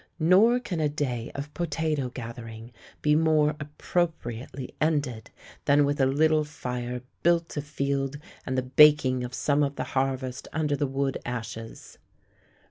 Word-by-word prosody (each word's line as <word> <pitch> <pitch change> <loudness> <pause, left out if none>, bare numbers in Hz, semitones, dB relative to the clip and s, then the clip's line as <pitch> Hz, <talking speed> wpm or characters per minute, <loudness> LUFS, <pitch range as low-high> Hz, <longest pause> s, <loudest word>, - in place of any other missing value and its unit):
Nor 190 +9 +5
can 200 -9 -4
a 150 -1 +2
day 130 -6 -3
of 140 +1 -6
potato 155 -5 -1
gathering 115 -1 -8 0.3
be 150 - +4
more 155 -1 +3
appropriately 140 -5 -3
ended 145 -7 0 0.4
than 145 0 +5
with 145 0 0
a 135 - +5
little 155 +3 +3
fire 125 -4 -5 0.2
built 170 0 +2
afield 140 -1 -2 0.3
and 130 - -3
the 130 - +1
baking 130 -1 +5
of 125 +1 -5
some 145 0 +1
of 140 -1 0
the - - -2
harvest 130 -1 -1
under 150 -2 0
the 145 0 0
wood 135 0 -1
ashes. 115 -2 -7
140 Hz, 140 wpm, -27 LUFS, 125-155 Hz, 0.4 s, Nor